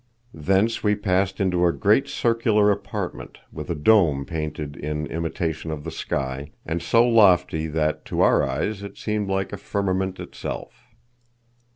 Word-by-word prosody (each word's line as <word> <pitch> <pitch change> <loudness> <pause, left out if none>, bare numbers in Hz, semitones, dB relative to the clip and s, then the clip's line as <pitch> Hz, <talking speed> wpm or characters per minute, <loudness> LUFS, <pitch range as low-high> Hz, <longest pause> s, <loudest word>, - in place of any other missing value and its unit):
Thence 95 +8 +1
we 105 -1 +3
passed 95 -1 0
into 90 -3 +1
a - - +3
great 105 +8 +2
circular 110 -3 +2
apartment, 100 - -5
with - - -7
a 85 - -1
dome 75 -5 +3
painted 75 -1 -4
in 75 +1 -3
imitation 80 +1 -3
of 75 -2 -5
the - - -5
sky, 65 +2 -3 0.2
and 85 +2 -2
so 115 +1 +4
lofty 95 -8 +4
that 75 0 -1
to - - -1
our - - +5
eyes 105 -1 -2
it 100 - -9
seemed 105 -2 -2
like 95 0 -1
the 100 - -6
firmament 95 -1 -2
itself. - - -7
95 Hz, 155 wpm, -23 LUFS, 80-105 Hz, 0.2 s, our